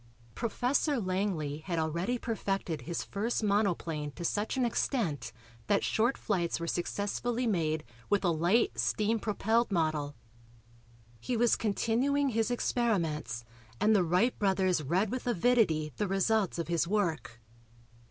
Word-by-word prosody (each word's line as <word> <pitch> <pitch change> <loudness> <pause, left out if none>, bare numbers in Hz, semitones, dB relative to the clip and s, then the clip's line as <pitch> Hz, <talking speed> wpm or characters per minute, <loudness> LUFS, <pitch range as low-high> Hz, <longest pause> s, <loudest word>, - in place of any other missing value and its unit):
Professor 250 +4 0
Langley 185 -7 -1
had 170 +1 -4
already 170 +9 -1
perfected 195 - -2
his 170 0 -3
first 220 +3 -2
monoplane 175 -7 0
to 170 - -6
such 210 +8 -1
an 255 - +2
extent 225 - -1 0.4
that 205 -1 +2
short 235 +4 +1
flights 175 -6 -1
were 170 - -3
successfully 205 +8 -2
made 160 -7 0 0.3
with 205 0 +2
a - - +4
light 175 +9 +2
steam 220 +2 +1
propelled 220 +2 +1
model. 155 -5 0 1.0
He 245 - -2
was 235 0 +4
continuing 250 +7 +1
his 225 -1 0
experiments 165 - -1 0.3
and 215 +1 +4
the 190 - +4
Wright 180 +9 +2
brothers 190 -4 +2
read 180 +8 0
with 255 0 -4
avidity 195 - +2
the 210 - 0
results 195 +1 +1
of 170 - -3
his 170 -1 +1
work. 170 - -1
200 Hz, 135 wpm, -31 LUFS, 170-230 Hz, 1.0 s, a